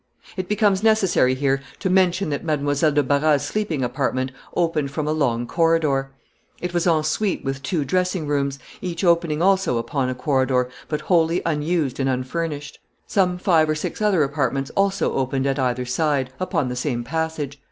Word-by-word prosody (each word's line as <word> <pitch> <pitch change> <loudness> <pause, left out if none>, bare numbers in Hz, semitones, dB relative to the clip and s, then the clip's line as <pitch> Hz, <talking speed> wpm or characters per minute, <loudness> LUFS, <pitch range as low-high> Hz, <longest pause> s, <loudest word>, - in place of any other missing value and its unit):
It 185 -1 -4
becomes 205 -2 +2
necessary 195 -12 +3
here 135 0 +1 0.2
to 195 - -3
mention 185 -2 +2
that 145 - -3
Mademoiselle 145 -1 +1
de 145 0 +2
Barras's 145 +1 +2
sleeping 175 -10 -2
apartment 130 +1 -1 0.2
opened 165 -5 0
from 150 +2 -3
a - - +1
long 125 -6 0
corridor. 155 -3 +1 0.5
It 180 0 -4
was 175 0 +1
en 160 -3 +3
suite 190 +6 -1
with 135 0 -3
two 145 +2 -1
dressing 180 +2 0
rooms, 140 -1 -1 0.2
each 175 -1 -4
opening 170 -2 +2
also 190 -9 +3
upon 130 +3 -1
the 130 - -2
corridor, 130 -1 +1 0.2
but 150 - -2
wholly 170 -1 +2
unused 155 -3 0
and 135 0 +1
unfurnished. 145 +3 -3 0.3
Some 180 -3 +1
five 165 -4 +3
or 155 - +1
six 155 - -4
other 200 -7 +3
apartments 135 -1 -1
also 195 0 +1
opened 135 0 -1
at 135 0 0
either 125 -1 0
side, 135 0 0
upon 165 -7 -1
the 125 - -3
same 125 -2 -2
passage. 155 0 -3
150 Hz, 175 wpm, -22 LUFS, 135-175 Hz, 0.5 s, necessary